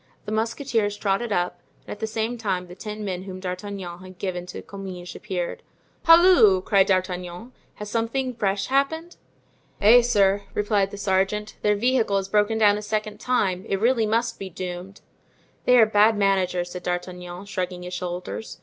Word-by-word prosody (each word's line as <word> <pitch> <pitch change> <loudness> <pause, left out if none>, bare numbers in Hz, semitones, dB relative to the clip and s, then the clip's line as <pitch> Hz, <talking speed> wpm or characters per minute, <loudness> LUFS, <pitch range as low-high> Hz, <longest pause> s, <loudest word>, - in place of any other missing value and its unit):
The 210 - -5
musketeers 225 -1 -1
trotted 205 +3 -1
up, 175 -2 -1 0.3
and - - -9
at 205 - -6
the 220 - -2
same 220 +2 -2
time 195 -6 -2
the 175 - -11
ten 210 +3 -6
men 185 -2 -3
whom 185 -1 -7
D'Artagnan 185 -1 -6
had 185 0 -12
given 180 -2 -4
to 180 - -8
Comminges 185 -3 -8
appeared. 185 -4 -4 0.4
"Halloo!" 330 - +7
cried 195 -1 +3
D'Artagnan; 185 +3 -2 0.2
"has 210 0 -7
something 250 +3 -1
fresh 200 -3 -1
happened?" 320 +6 -1 0.6
"Eh, 230 +4 +7
sir!" 205 -4 +3
replied 205 -2 +1
the 205 - -8
sergeant, 200 +2 0
"their 210 0 +3
vehicle 230 -2 +2
has 195 0 -3
broken 210 +1 +2
down 210 -1 +4
a - - -7
second 215 0 -3
time; 195 -7 0
it 195 - 0
really 230 0 +2
must 230 +2 0
be 195 - -6
doomed." 180 +2 -7 0.6
"They 250 - +6
are 225 - +8
bad 215 0 +4
managers," 185 -3 +1
said 180 - -6
D'Artagnan, 180 +1 -5
shrugging 180 -3 -4
his 180 0 -7
shoulders. 180 +4 -5
200 Hz, 170 wpm, -24 LUFS, 185-220 Hz, 0.6 s, are